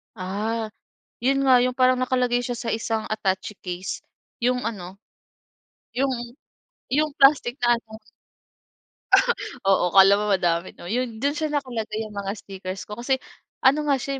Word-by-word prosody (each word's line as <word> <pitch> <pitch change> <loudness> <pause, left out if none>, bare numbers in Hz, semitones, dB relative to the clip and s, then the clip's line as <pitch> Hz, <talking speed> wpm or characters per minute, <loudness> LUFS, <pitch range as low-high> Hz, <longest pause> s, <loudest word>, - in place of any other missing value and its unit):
Ah, 215 +4 -3 0.5
‘yon 270 +2 +3
nga, 255 -2 +7
‘yong 250 0 0
parang 255 0 +4
nakalagay 250 -1 +1
siya 245 0 -3
sa 230 -1 -2
isang 225 0 -2
attache 205 -1 -2
case, 180 +1 -5 0.4
‘yong 250 +1 +1
ano, 190 -3 -6 1.0
‘yong 245 -2 -2 0.6
‘yong 300 +3 +2
plastic 270 -3 +5
na 240 0 +4
ano. 220 -1 -13 1.7
Oo, 195 -2 +3
akala 195 +2 +7
mo 210 - -1
madami, 175 -2 +1
‘no? - - -11
‘Yon, 230 +4 -2
do’n 285 +1 +1
siya 310 -1 -2
nakalagay 240 -7 -3
'yong 215 -1 -9
mga 200 -1 -3
stickers 190 -1 -7
ko 210 +2 -8
kasi, 265 +2 +1 0.5
ano 295 +3 +4
nga, 280 - +5
siya, 270 +1 -4
235 Hz, 150 wpm, -24 LUFS, 200-255 Hz, 1.7 s, nga